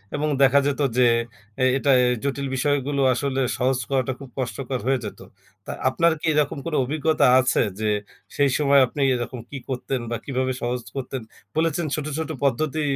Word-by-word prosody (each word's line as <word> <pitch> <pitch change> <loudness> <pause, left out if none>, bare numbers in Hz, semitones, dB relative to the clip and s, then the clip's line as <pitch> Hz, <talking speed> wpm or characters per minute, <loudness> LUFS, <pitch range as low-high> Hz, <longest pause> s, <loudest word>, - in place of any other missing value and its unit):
এবং 150 +1 -1 0.2
দেখা 135 +1 +6
যেত 145 0 -1 0.2
যে, 125 -1 +6 0.6
এ - - +5
এটা 140 +1 +2 0.3
জটিল 140 0 -2
বিষয়গুলো 140 0 0
আসলে 135 +1 -1 0.2
সহজ 130 +1 +1
করাটা 130 -1 0
খুব 135 -2 -10
কষ্টকর 130 +1 -3
হয়ে 135 -1 +2
যেত। 105 - -7 0.5
তা - - -5 0.2
আপনার 170 +5 +3
কি - - -6
এরকম 150 -1 +1
কোনো 160 -2 -1
অভিজ্ঞতা 155 +4 +1
আছে? 130 +1 +2 0.2
যে, 110 -1 0 0.5
সেই 140 -1 +4
সময় 140 -1 +4
আপনি 140 +4 -5
এরকম 120 +1 -4
কী 140 - -6
করতেন 130 0 -2
বা 120 - 0
কীভাবে 130 -1 -1
সহজ 125 +1 -2
করতেন 135 -1 -4 0.3
বলেছেন, 165 +1 +1
ছোট, 150 - -4
ছোট 160 - -3
পদ্ধতি 150 +3 0
135 Hz, 170 wpm, -23 LUFS, 130-145 Hz, 0.6 s, দেখা